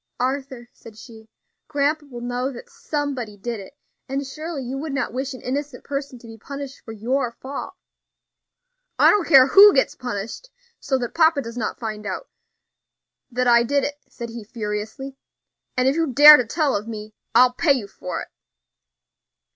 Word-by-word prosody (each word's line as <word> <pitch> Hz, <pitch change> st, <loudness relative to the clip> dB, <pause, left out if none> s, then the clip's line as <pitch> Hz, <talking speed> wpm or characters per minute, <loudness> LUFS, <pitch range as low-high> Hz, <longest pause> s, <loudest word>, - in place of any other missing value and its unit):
"Arthur," 260 Hz, -1 st, -3 dB
said 225 Hz, -2 st, -15 dB
she, 220 Hz, -2 st, -14 dB, 0.4 s
"grandpa 295 Hz, 0 st, 0 dB
will 240 Hz, -3 st, -9 dB
know 245 Hz, +2 st, -2 dB
that 240 Hz, -, -11 dB
somebody 270 Hz, -8 st, -4 dB
did 230 Hz, +2 st, -5 dB
it, 195 Hz, +9 st, -12 dB, 0.3 s
and 275 Hz, +1 st, -2 dB
surely 305 Hz, +1 st, -6 dB
you 255 Hz, +2 st, -5 dB
would 285 Hz, +1 st, -4 dB
not 270 Hz, -4 st, -2 dB
wish 265 Hz, +2 st, -3 dB
an -, -, -13 dB
innocent 280 Hz, 0 st, -4 dB
person 275 Hz, -2 st, -5 dB
to 235 Hz, -, -16 dB
be 225 Hz, -1 st, -11 dB
punished 280 Hz, +2 st, -8 dB
for 225 Hz, -, -11 dB
your 240 Hz, +3 st, -1 dB
fault." 270 Hz, +3 st, -7 dB, 1.2 s
"I -, -, +7 dB
don't 415 Hz, -5 st, +1 dB
care 270 Hz, -1 st, +7 dB
who 400 Hz, +5 st, +8 dB
gets 265 Hz, -, +2 dB
punished, 240 Hz, -, -6 dB, 0.3 s
so 265 Hz, -1 st, 0 dB
that 240 Hz, -2 st, -4 dB
papa 320 Hz, -4 st, +3 dB
does 230 Hz, 0 st, -8 dB
not 230 Hz, -3 st, -3 dB
find 215 Hz, -2 st, -5 dB
out -, -, -5 dB, 1.0 s
that 250 Hz, 0 st, -1 dB
I 235 Hz, -1 st, +6 dB
did 280 Hz, +4 st, +1 dB
it," 290 Hz, 0 st, -4 dB
said 235 Hz, -1 st, -7 dB
he 230 Hz, -1 st, -8 dB
furiously; 220 Hz, +4 st, -5 dB, 0.6 s
"and 255 Hz, +1 st, +3 dB
if 270 Hz, -, +2 dB
you 330 Hz, 0 st, +1 dB
dare 295 Hz, +3 st, +10 dB
to 245 Hz, -, -1 dB
tell 295 Hz, 0 st, 0 dB
of 205 Hz, +2 st, -3 dB
me, 215 Hz, -1 st, -7 dB, 0.2 s
I'll 250 Hz, +1 st, +6 dB
pay 280 Hz, +3 st, +3 dB
you 240 Hz, -7 st, -3 dB
for 180 Hz, -, -6 dB
it." -, -, -14 dB
255 Hz, 180 wpm, -22 LUFS, 230-280 Hz, 1.2 s, dare